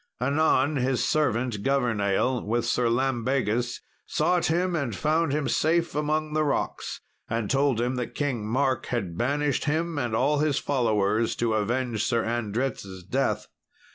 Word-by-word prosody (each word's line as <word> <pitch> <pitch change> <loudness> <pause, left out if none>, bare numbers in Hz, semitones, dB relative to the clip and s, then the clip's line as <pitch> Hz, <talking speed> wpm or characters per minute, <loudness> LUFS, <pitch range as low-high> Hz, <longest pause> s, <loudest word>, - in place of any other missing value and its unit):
Anon, 140 +2 +2
his 130 0 +1
servant 125 -7 0
Governale, 120 -2 +1
with 115 +2 0
Sir 120 -1 +1
Lambegus 120 -1 0 0.3
sought 180 -1 +1
him 175 +2 +1
and 135 - -2
found 155 - +1
him 150 0 0
safe 170 +1 +1
among 150 +1 -1
the 155 0 +2
rocks, 145 - -2 0.3
and 115 -2 -1
told 135 -3 +2
him 125 +2 0
that 125 - -4
King 135 -7 -1
Mark 130 +1 0
had 100 -9 -2
banished 140 +5 0
him 160 +1 0
and 120 -4 -1
all 140 +5 +2
his 150 -2 +1
followers 110 -4 +1
to 115 -2 0
avenge 115 +1 0
Sir 115 -2 +1
Andret's 110 -4 -3
death. 105 0 -1
130 Hz, 145 wpm, -26 LUFS, 115-145 Hz, 0.3 s, Anon